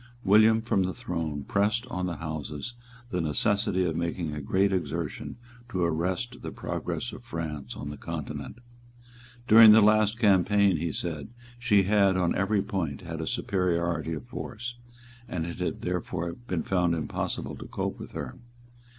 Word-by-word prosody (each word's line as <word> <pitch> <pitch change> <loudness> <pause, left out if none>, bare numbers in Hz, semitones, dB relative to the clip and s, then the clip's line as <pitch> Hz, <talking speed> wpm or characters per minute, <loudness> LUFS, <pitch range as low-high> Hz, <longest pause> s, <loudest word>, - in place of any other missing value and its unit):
William 110 +3 +6
from 110 -4 +1
the 95 -2 -1
throne 75 -4 -3
pressed 105 +4 +1
on 90 -7 -3
the 85 - -3
Houses 80 +6 -5 0.4
the 90 - 0
necessity 95 +4 +2
of 80 -3 -1
making 85 -1 -2
a 75 - -4
great 95 +7 +2
exertion 85 -3 -3 0.3
to 95 -6 -1
arrest 90 +9 -1
the - - -5
progress - - -4
of - - -10
France 75 -5 -5
on 75 - -6
the 75 - -8
Continent. 85 - -6 0.9
During 110 -1 +10
the 110 - +7
last 110 +1 +4
campaign, 100 -3 +4
he 85 +1 -2
said, 80 -2 -4 0.3
she 105 -6 +4
had, 100 -1 +3
on 90 -2 +2
every 100 0 +1
point, 85 -9 -3
had 80 -1 -5
a 80 - -4
superiority 85 -6 0
of 75 -5 -6
force; 120 - -6 0.6
and 80 -2 -2
it 85 +1 -6
had 90 - -3
therefore 90 -1 -2
been 90 -6 -4
found 90 -3 +1
impossible 80 -3 -3
to - - -9
cope - - -3
with - - -9
her. - - -6
90 Hz, 160 wpm, -28 LUFS, 80-105 Hz, 0.9 s, During